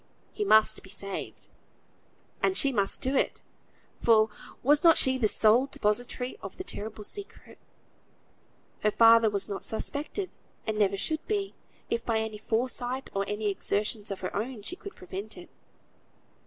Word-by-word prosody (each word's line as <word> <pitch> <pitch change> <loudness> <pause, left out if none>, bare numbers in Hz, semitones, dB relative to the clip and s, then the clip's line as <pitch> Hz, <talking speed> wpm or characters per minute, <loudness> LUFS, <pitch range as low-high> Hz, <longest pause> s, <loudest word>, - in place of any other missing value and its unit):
He 420 - -2
must 220 - +4
be 190 - -14
saved. 195 0 -5 0.9
And 380 - +2
she 275 - +5
must 200 -5 0
do 265 +2 0
it; - - 0 0.6
for 220 -2 +4 0.3
was 290 +5 +4
not 330 -2 +7
she 260 0 +4
the 220 - +3
sole 225 +5 +4
depository 245 - -1
of - - -8
the 370 - -5
terrible 215 - -6
secret? 400 - -5 1.2
Her 210 - +2
father 230 +1 +6
was 200 -1 -2
not 200 -2 -5
suspected; 300 - -2 0.3
and 215 -1 -2
never 200 -1 +2
should 315 +10 -1
be, 405 -2 -1 0.4
if 235 - 0
by 230 -2 0
any 220 -1 -3
foresight 245 +3 -2
or 195 0 -1
any 210 0 -1
exertions 210 +2 -1
of 195 - -5
her 185 - -4
own 220 +1 -4
she 350 - -4
could 400 +2 -10
prevent 195 +4 -7
it. 355 - -12
225 Hz, 155 wpm, -28 LUFS, 210-270 Hz, 1.2 s, not